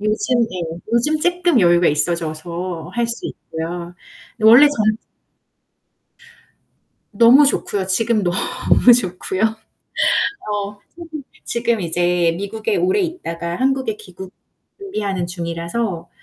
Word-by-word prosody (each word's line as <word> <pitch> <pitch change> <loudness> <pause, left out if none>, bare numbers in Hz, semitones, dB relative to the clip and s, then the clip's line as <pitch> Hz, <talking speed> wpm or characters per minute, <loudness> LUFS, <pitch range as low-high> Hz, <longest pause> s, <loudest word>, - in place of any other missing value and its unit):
요즘 215 +4 0
예. 175 -6 -4
요즘 300 +7 +2
쪼끔 355 - +2
여유가 175 -1 +4
있어져서 170 +2 -2
할 235 -1 0
수 235 0 -3
있고요. 170 +2 -7 0.5
원래 235 +7 +8
전 215 -6 0 2.2
너무 240 +7 +6
좋고요. 200 -7 0
지금 215 +2 +1
너무 185 +6 +3
좋고요. 185 -2 -3 1.1
어 205 0 -4 0.6
지금 235 -3 -1
이제 175 0 +1
미국에 215 - -3
오래 385 +2 +1
있다가 170 - -4
한국에 270 +9 0
귀국 190 - -11 0.5
준비하는 205 - -3
중이라서 170 +4 -4
어 170 -5 -6
200 Hz, 225 characters per minute, -19 LUFS, 175-240 Hz, 2.2 s, 원래